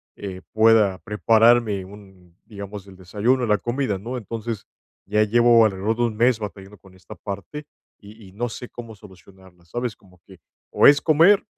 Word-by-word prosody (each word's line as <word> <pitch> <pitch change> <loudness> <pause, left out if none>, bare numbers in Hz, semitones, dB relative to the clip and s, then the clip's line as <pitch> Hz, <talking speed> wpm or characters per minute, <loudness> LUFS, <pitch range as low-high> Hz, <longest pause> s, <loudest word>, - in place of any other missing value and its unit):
eh, 95 -2 -8
pueda 110 -3 +4
prepararme, 110 +1 +2
un 95 -3 -17
digamos, 100 -1 -9
el 95 - -14
desayuno, 110 +7 -1
la 105 -1 +2
comida, 120 -3 -2
¿no? 120 +6 -6
Entonces, 115 -1 -6 0.4
ya 105 +1 +1
llevo 120 +1 +4
alrededor 105 +2 -1
de - - -2
un 115 -2 -1
mes 120 0 +2
batallando 100 -1 -9
con 95 -1 -19
esta 95 - -13
parte 100 - -8 0.3
y 105 0 -15
y - - -18
no 120 +4 -3
sé 125 +2 -9
cómo 115 -2 -10
solucionarla, 95 -3 -18
¿sabes? 120 +5 -4
Como 90 -2 -24
que, 95 -2 -16 0.3
o - - +5
es 145 0 +6
comer, 170 +7 +4
105 Hz, 170 wpm, -22 LUFS, 95-120 Hz, 0.4 s, es